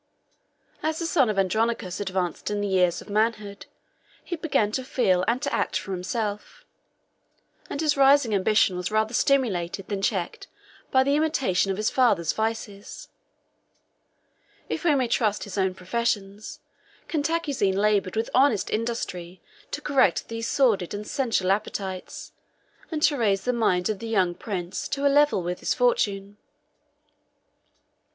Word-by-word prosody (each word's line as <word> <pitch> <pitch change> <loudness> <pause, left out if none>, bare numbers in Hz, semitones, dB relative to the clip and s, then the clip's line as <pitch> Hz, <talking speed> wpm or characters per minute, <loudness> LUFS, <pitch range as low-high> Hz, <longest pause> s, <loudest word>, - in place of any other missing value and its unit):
As 315 0 -1
the 335 - -3
son 285 -7 +2
of 210 - -2
Andronicus 195 0 0
advanced 185 -4 -2
in 205 0 -2
the 205 - -1
years 180 -3 +1
of - - -22
manhood, 215 -1 -1 0.6
he 345 - -4
began 295 -10 0
to 260 +4 -2
feel 190 -8 +1
and 235 +2 +1
to - - -2
act - - 0
for 185 +1 -6
himself; 210 - -4 1.0
and - - -4
his 305 -2 +2
rising 275 -4 +4
ambition 200 -1 +3
was 180 0 -3
rather 220 +1 0
stimulated 195 -10 0
than 200 -2 -2
checked 190 -4 -2 0.4
by 260 0 +4
the 280 +2 +2
imitation 275 - +1
of 190 - -1
his 215 +1 0
father's 200 -11 +2
vices. 220 -2 -4 1.6
If - - -3
we 315 -4 +3
may 260 -3 +1
trust 215 -3 0
his 205 - -7
own 190 -2 0
professions, 205 +1 -3 0.5
Cantacuzene 290 - 0
labored 200 -2 +1
with 225 +1 -2
honest 255 -5 +3
industry 190 -6 -3 0.3
to - - -5
correct 275 -3 +2
these 230 0 -4
sordid 215 -10 +1
and 210 +1 -6
sensual 225 -7 0
appetites, 195 -2 -4 0.6
and 310 -2 -3
to 290 -1 +4
raise 200 -4 +1
the 250 - 0
mind 185 -6 +1
of 215 -3 -2
the 230 - -6
young 190 -6 +1
prince 180 -2 -5
to 280 0 -2
a 280 - +4
level 290 -10 +3
with 180 +1 -3
his - - -1
fortune. 205 - 0
215 Hz, 150 wpm, -25 LUFS, 190-260 Hz, 1.6 s, rising